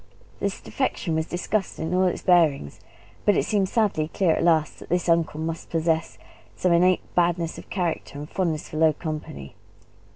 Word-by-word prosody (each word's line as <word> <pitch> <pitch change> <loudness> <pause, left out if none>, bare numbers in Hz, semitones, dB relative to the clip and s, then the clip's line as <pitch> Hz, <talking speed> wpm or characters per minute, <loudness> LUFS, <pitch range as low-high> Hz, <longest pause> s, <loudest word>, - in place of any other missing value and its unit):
The 200 - 0
defection 195 -4 -3
was 160 0 -1
discussed 190 +3 -2
in 160 +2 -3
all 185 +1 +3
its 180 - -1
bearings, 160 - +3 0.4
but 205 - +3
it - - +1
seemed 200 -3 +1
sadly 205 -9 +1
clear 175 +1 +1
at - - -1
last 160 -3 +2
that - - -12
this 180 +1 0
uncle 165 -2 +2
must 165 +1 -4
possess 165 0 0 0.4
some 180 - +1
innate 180 +2 +2
badness 170 -1 +1
of - - -14
character 170 -6 -3
and 145 +1 -6
fondness 165 -3 -2
for 155 - -7
low 160 -1 +4
company. 150 - -6
170 Hz, 175 wpm, -24 LUFS, 160-180 Hz, 0.4 s, low